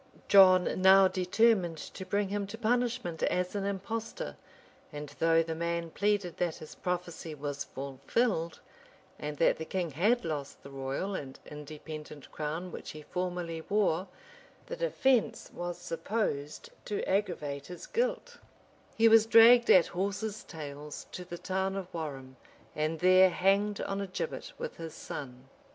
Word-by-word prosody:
Johfi 185 Hz, -2 st, +7 dB
now 190 Hz, +1 st, +7 dB
determined 185 Hz, -1 st, +2 dB
to 190 Hz, +4 st, -8 dB
bring 200 Hz, -1 st, 0 dB
him 200 Hz, 0 st, -2 dB
to 210 Hz, +3 st, -7 dB
punishment 235 Hz, -6 st, 0 dB
as 180 Hz, 0 st, 0 dB
an 200 Hz, -1 st, -2 dB
impostor; 200 Hz, -, -4 dB, 0.6 s
and 150 Hz, -1 st, -7 dB
though 165 Hz, 0 st, +4 dB
the 165 Hz, 0 st, -4 dB
man 170 Hz, 0 st, -2 dB
pleaded 205 Hz, -3 st, 0 dB
that 175 Hz, -3 st, 0 dB
his 155 Hz, -, -10 dB
prophecy 175 Hz, -3 st, -4 dB
was 145 Hz, -1 st, -4 dB
fulfilled, 165 Hz, -, -2 dB, 0.6 s
and 150 Hz, 0 st, -5 dB
that 165 Hz, -, +3 dB
the 160 Hz, -, -4 dB
king 175 Hz, -1 st, -2 dB
had 210 Hz, -, +2 dB
lost 145 Hz, -4 st, -5 dB
the 140 Hz, -, -11 dB
royal 135 Hz, +8 st, -3 dB
and 135 Hz, -7 st, -6 dB
independent 150 Hz, 0 st, -9 dB
crown 160 Hz, +4 st, -4 dB
which -, -, -8 dB
he 155 Hz, 0 st, -9 dB
formerly 175 Hz, -1 st, -3 dB
wore, 195 Hz, -3 st, +2 dB, 0.6 s
the -, -, -5 dB
defence 265 Hz, -, +1 dB
was 175 Hz, 0 st, -4 dB
supposed 165 Hz, -6 st, -3 dB
to 205 Hz, -, -3 dB
aggravate 160 Hz, -8 st, -1 dB
his 180 Hz, -1 st, -8 dB
guilt: -, -, -2 dB, 0.6 s
he 225 Hz, 0 st, +6 dB
was 225 Hz, -1 st, +6 dB
dragged 235 Hz, +2 st, +7 dB
at 180 Hz, -, +8 dB
horses' 200 Hz, +3 st, -3 dB
tails 150 Hz, -2 st, -8 dB
to 180 Hz, -, -6 dB
the 175 Hz, -1 st, -7 dB
town 190 Hz, +1 st, -2 dB
of 195 Hz, -2 st, -4 dB
Warham, 135 Hz, -5 st, -6 dB, 0.4 s
and 155 Hz, +2 st, -1 dB
there 185 Hz, +1 st, +7 dB
hanged 200 Hz, +3 st, +2 dB
on 195 Hz, 0 st, -2 dB
a 200 Hz, -, -3 dB
gibbet 475 Hz, -, -5 dB
with 485 Hz, 0 st, -6 dB
his 165 Hz, -2 st, -7 dB
son. 125 Hz, -1 st, -8 dB
180 Hz, 150 wpm, -30 LUFS, 155-205 Hz, 0.6 s, at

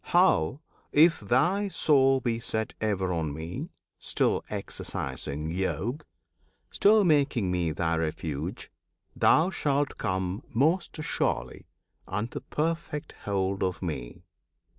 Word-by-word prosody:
how, 80 Hz, -, +3 dB, 0.3 s
if 160 Hz, +2 st, +5 dB
thy 175 Hz, -, +2 dB
soul 135 Hz, -7 st, +4 dB
be 120 Hz, -3 st, -1 dB
set 110 Hz, -1 st, -2 dB
Ever 95 Hz, -4 st, 0 dB
on 80 Hz, -3 st, -1 dB
Me 80 Hz, +4 st, -5 dB, 0.3 s
still -, -, +1 dB
exercising 70 Hz, +4 st, -4 dB
Yog, 95 Hz, -, -2 dB, 0.7 s
Still 210 Hz, +1 st, +5 dB
making 140 Hz, -, +2 dB
Me 90 Hz, -3 st, 0 dB
thy 80 Hz, +1 st, 0 dB
Refuge 80 Hz, -2 st, -3 dB, 0.4 s
thou 170 Hz, +4 st, +4 dB
shalt 145 Hz, -4 st, 0 dB
come 95 Hz, +2 st, -1 dB
Most 160 Hz, +10 st, +1 dB
surely 65 Hz, -, -2 dB, 0.4 s
unto 110 Hz, +4 st, -3 dB
perfect 160 Hz, -1 st, -3 dB
hold 95 Hz, -1 st, 0 dB
of 95 Hz, -1 st, -1 dB
Me. -, -, -5 dB
105 Hz, 110 wpm, -28 LUFS, -, 0.7 s, if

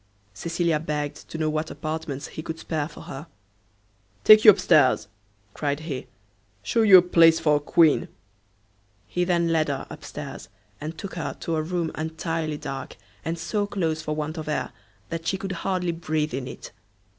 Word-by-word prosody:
Cecilia 165 Hz, -, 0 dB
begged 150 Hz, -2 st, -4 dB
to -, -, -6 dB
know 155 Hz, -1 st, 0 dB
what 155 Hz, +1 st, -2 dB
apartments 155 Hz, -1 st, -5 dB
he -, -, -7 dB
could 160 Hz, 0 st, -5 dB
spare 155 Hz, -2 st, -2 dB
for -, -, -12 dB
her. 140 Hz, +5 st, -8 dB, 1.0 s
"Take 215 Hz, -, +9 dB
you -, -, +11 dB
up 205 Hz, -, +8 dB
stairs," 130 Hz, -7 st, +4 dB, 0.5 s
cried 145 Hz, 0 st, -2 dB
he, 145 Hz, -5 st, -5 dB, 0.6 s
"shew 230 Hz, -, +1 dB
you 200 Hz, -4 st, +9 dB
a -, -, +8 dB
place 165 Hz, -2 st, +5 dB
for 150 Hz, -1 st, +3 dB
a -, -, -2 dB
queen." 155 Hz, +1 st, +3 dB, 1.0 s
He 180 Hz, -, -1 dB
then 170 Hz, -2 st, +2 dB
led 160 Hz, -1 st, +2 dB
her 140 Hz, -2 st, -3 dB
up -, -, -10 dB
stairs, -, -, -8 dB, 0.3 s
and 155 Hz, +2 st, -5 dB
took 195 Hz, +3 st, -7 dB
her 170 Hz, -, -4 dB
to 165 Hz, -, -1 dB
a 155 Hz, -, +1 dB
room 165 Hz, 0 st, -2 dB
entirely 160 Hz, -1 st, -3 dB
dark, 135 Hz, -2 st, -6 dB, 0.3 s
and 165 Hz, +1 st, -2 dB
so 205 Hz, +4 st, -1 dB
close 165 Hz, -6 st, -1 dB
for 150 Hz, -, -3 dB
want 155 Hz, +2 st, -3 dB
of 155 Hz, -, -5 dB
air 150 Hz, -, -2 dB, 0.4 s
that 165 Hz, 0 st, -5 dB
she 190 Hz, -, +1 dB
could 195 Hz, 0 st, -5 dB
hardly 185 Hz, -1 st, -1 dB
breathe 155 Hz, -3 st, -2 dB
in 130 Hz, 0 st, -3 dB
it. -, -, -9 dB
160 Hz, 180 wpm, -25 LUFS, 150-170 Hz, 1.0 s, you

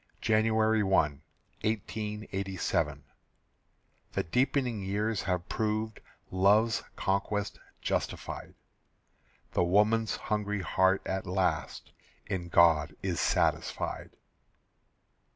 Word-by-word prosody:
January 110 Hz, 0 st, +3 dB
1, 75 Hz, -8 st, +2 dB, 0.4 s
1887. 105 Hz, -3 st, -2 dB, 1.1 s
The -, -, 0 dB
deepening 125 Hz, -, 0 dB
years 105 Hz, +2 st, -1 dB
have 90 Hz, -2 st, -2 dB
proved 110 Hz, 0 st, -1 dB, 0.3 s
Love's 105 Hz, +5 st, +4 dB
conquest 100 Hz, +1 st, -1 dB, 0.2 s
justified. -, -, -3 dB, 1.0 s
The -, -, +2 dB
woman's 105 Hz, +5 st, +3 dB
hungry 105 Hz, -1 st, -2 dB
heart 95 Hz, +1 st, +2 dB
at 95 Hz, +1 st, -3 dB
last 95 Hz, +1 st, -1 dB, 0.3 s
In 95 Hz, -3 st, -3 dB
God 80 Hz, -3 st, +4 dB
is 90 Hz, -4 st, -1 dB
satisfied. -, -, 0 dB
100 Hz, 80 wpm, -30 LUFS, 95-110 Hz, 1.1 s, Love's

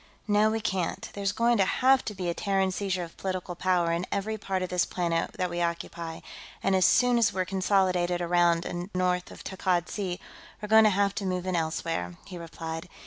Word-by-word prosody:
"No, 210 Hz, +1 st, +4 dB
we 220 Hz, +1 st, -1 dB
can't. 190 Hz, -4 st, -2 dB
There's 200 Hz, -1 st, -1 dB
going 235 Hz, +3 st, +2 dB
to 195 Hz, -, +5 dB
have 260 Hz, +6 st, +3 dB
to 210 Hz, -, -4 dB
be 185 Hz, -2 st, -4 dB
a 170 Hz, -, 0 dB
Terran 195 Hz, 0 st, 0 dB
seizure 185 Hz, -1 st, -2 dB
of 165 Hz, -, -10 dB
political 185 Hz, -2 st, -3 dB
power 175 Hz, -1 st, +1 dB
in 170 Hz, +2 st, -1 dB
every 215 Hz, +2 st, -1 dB
part 195 Hz, -3 st, -2 dB
of 180 Hz, -, -3 dB
this 180 Hz, 0 st, +2 dB
planet 170 Hz, -2 st, -1 dB
that 185 Hz, -, -1 dB
we 175 Hz, 0 st, -3 dB
occupy, 170 Hz, -1 st, -3 dB, 0.4 s
and 195 Hz, 0 st, +2 dB
as 185 Hz, -, +4 dB
soon 245 Hz, -1 st, +4 dB
as 225 Hz, -, +3 dB
we're 185 Hz, 0 st, -1 dB
consolidated 185 Hz, -2 st, +1 dB
around 175 Hz, -1 st, +2 dB
and 175 Hz, +2 st, -4 dB
north 180 Hz, -1 st, 0 dB
of -, -, -11 dB
Takkad 180 Hz, -2 st, -1 dB
Sea, 185 Hz, -3 st, -3 dB, 0.4 s
we're 210 Hz, -, -7 dB
going 220 Hz, 0 st, +7 dB
to -, -, +6 dB
have 200 Hz, 0 st, +1 dB
to 200 Hz, -, -4 dB
move 180 Hz, -1 st, -2 dB
in 185 Hz, -1 st, -1 dB
elsewhere," 160 Hz, -, -2 dB
he 180 Hz, -3 st, -8 dB
replied. 165 Hz, 0 st, -6 dB
185 Hz, 210 wpm, -28 LUFS, 175-200 Hz, 0.4 s, going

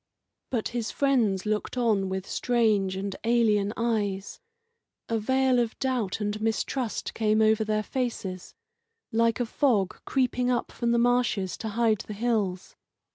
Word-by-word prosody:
But 235 Hz, -4 st, -1 dB
his 235 Hz, -2 st, -3 dB
friends 230 Hz, -9 st, +1 dB
looked 215 Hz, +3 st, -2 dB
on 215 Hz, -6 st, +2 dB
with 190 Hz, 0 st, -4 dB
strange 215 Hz, -6 st, +1 dB
and 195 Hz, 0 st, -4 dB
alien 220 Hz, -3 st, +2 dB
eyes. 205 Hz, -4 st, -1 dB, 0.7 s
A 225 Hz, -1 st, 0 dB
veil 260 Hz, +2 st, +2 dB
of 235 Hz, -1 st, -1 dB
doubt 250 Hz, -8 st, -1 dB
and 210 Hz, 0 st, -2 dB
mistrust 225 Hz, +2 st, -2 dB
came 215 Hz, -1 st, +2 dB
over 220 Hz, 0 st, +4 dB
their 215 Hz, 0 st, 0 dB
faces, 210 Hz, -8 st, -4 dB, 0.6 s
like 230 Hz, +1 st, +2 dB
a 245 Hz, -, +1 dB
fog 225 Hz, -7 st, +1 dB
creeping 250 Hz, -1 st, +1 dB
up 245 Hz, -1 st, 0 dB
from 235 Hz, -1 st, -1 dB
the 235 Hz, -, +3 dB
marshes 240 Hz, -6 st, +1 dB
to 220 Hz, -, -4 dB
hide 220 Hz, -1 st, +2 dB
the 215 Hz, -, -7 dB
hills. 205 Hz, -5 st, -1 dB
220 Hz, 145 wpm, -27 LUFS, 205-240 Hz, 0.7 s, over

